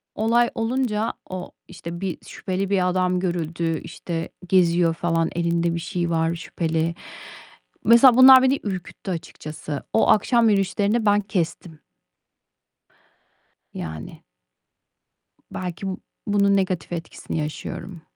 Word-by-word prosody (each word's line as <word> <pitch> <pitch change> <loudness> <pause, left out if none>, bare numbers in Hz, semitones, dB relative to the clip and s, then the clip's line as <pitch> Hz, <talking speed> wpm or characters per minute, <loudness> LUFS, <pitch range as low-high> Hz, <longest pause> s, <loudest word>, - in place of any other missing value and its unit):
olay 235 +2 +2
olunca 225 -2 -1 0.2
o 185 -1 -6 0.2
işte, 170 -1 -8
bir 190 -3 -3
şüpheli 190 0 -3
bir 185 -2 +2
adam 180 0 +1
görüldü, 170 -2 -2
işte, 165 -2 -5 0.2
geziyor 175 -2 +3
falan 165 0 0
elinde 170 0 0
bir - - -2
şey 175 0 -3
var 165 0 0
şüpheli. 165 0 -2 0.9
Mesela, 235 +3 +7
bunlar 260 0 +9
beni 265 +1 +2
ürküttü 190 -1 -6
açıkçası. 155 -3 -6
O 225 - +3
akşam 230 +2 +4
yürüyüşlerini 205 +3 +1
ben 205 0 +4
kestim. 175 -5 -4 1.9
Yani. 80 -1 -7 1.3
Belki 180 +1 -5
b 190 - -3 0.3
bunun 200 -1 +3
negatif 185 -4 -1
etkisini 165 -1 -5
yaşıyorum. 155 +3 -6
180 Hz, 110 wpm, -23 LUFS, 170-205 Hz, 1.9 s, bunlar